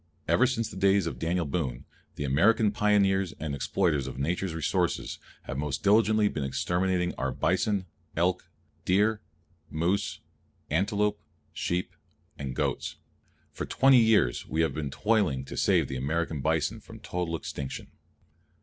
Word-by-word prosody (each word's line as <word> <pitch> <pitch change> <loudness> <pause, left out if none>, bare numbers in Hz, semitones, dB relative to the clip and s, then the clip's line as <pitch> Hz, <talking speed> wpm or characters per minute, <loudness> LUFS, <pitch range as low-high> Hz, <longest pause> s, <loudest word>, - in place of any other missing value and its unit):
Ever 130 - +4
since 115 -3 -1
the - - -9
days 95 -1 +3
of 85 - -4
Daniel 85 +1 0
Boone, 70 -5 -3 0.3
the - - -4
American 100 +10 +3
pioneers 100 -3 +2
and 80 -2 -3
exploiters 75 0 0
of 65 - -7
Nature's 85 +5 -1
resources 80 - -1 0.2
have 65 - -5
most 75 -1 -3
diligently 110 +1 +4
been 75 -8 -3
exterminating 90 +6 0
our - - 0
bison, 100 -3 0 0.3
elk, 90 +2 0 0.3
deer, 105 +3 +2 0.5
moose, 85 +6 -1 0.5
antelope, 105 +5 +1 0.3
sheep, 90 +1 -2 0.4
and 65 -3 -5
goats. - - -2 0.6
For - - -5
twenty 135 -1 +5
years 110 - +3
we 80 - 0
have 80 - +1
been 75 -3 -3
toiling 90 -7 +1
to - - -8
save - - +3
the 65 - -4
American 80 +2 -1
bison 80 +8 0
from 110 +1 -13
total 90 -5 -3
extinction. 70 -4 -6
90 Hz, 140 wpm, -28 LUFS, 75-105 Hz, 0.6 s, twenty